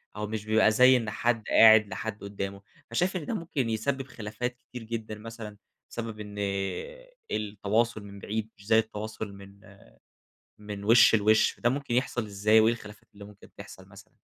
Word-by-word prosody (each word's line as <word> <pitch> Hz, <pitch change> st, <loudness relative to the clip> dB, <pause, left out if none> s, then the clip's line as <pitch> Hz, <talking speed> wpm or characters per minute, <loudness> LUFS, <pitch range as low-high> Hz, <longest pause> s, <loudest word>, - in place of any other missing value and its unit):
أو 105 Hz, 0 st, -4 dB
مش 110 Hz, 0 st, -5 dB
بيبقى 110 Hz, 0 st, +4 dB
زي 125 Hz, +3 st, +6 dB
إن 115 Hz, -2 st, -3 dB
حدّ 115 Hz, +2 st, 0 dB
قاعِد 110 Hz, -1 st, +7 dB
لحَدّ 105 Hz, 0 st, -6 dB
قُدّامه، 100 Hz, -1 st, -5 dB, 0.3 s
فشايف 180 Hz, +11 st, 0 dB
إن 155 Hz, -, -6 dB
ده -, -, -3 dB
ممكن 160 Hz, -, -2 dB
يسبب 130 Hz, +5 st, -2 dB
خلافات 125 Hz, +2 st, -5 dB
كتير 125 Hz, -2 st, -8 dB
جدًا 110 Hz, -1 st, -5 dB
مثلًا، 110 Hz, -1 st, -9 dB, 0.3 s
بسبب 115 Hz, -2 st, -6 dB
إن 105 Hz, -1 st, -8 dB, 1.0 s
التواصل 105 Hz, +2 st, -1 dB
من 100 Hz, 0 st, -11 dB
بعيد 110 Hz, +2 st, -4 dB
مش 100 Hz, -, -17 dB
زي 110 Hz, 0 st, +5 dB
التواصل 110 Hz, -1 st, -5 dB
من 100 Hz, 0 st, -15 dB, 0.8 s
من 105 Hz, -1 st, -8 dB
وِشّ 115 Hz, +1 st, +6 dB
لوِشّ. 110 Hz, 0 st, +3 dB
ده 120 Hz, -, +2 dB
مُمكن 135 Hz, -2 st, -3 dB
يحصل 125 Hz, -1 st, 0 dB
إزاي 105 Hz, +2 st, +3 dB
وإيه 110 Hz, +1 st, +4 dB
الخلافات 105 Hz, -2 st, -10 dB
اللي 100 Hz, 0 st, -11 dB
مُمكن 100 Hz, 0 st, -16 dB
تحصل -, -, -12 dB
مثلًا؟ -, -, -16 dB
110 Hz, 170 wpm, -28 LUFS, 105-115 Hz, 1.0 s, قاعِد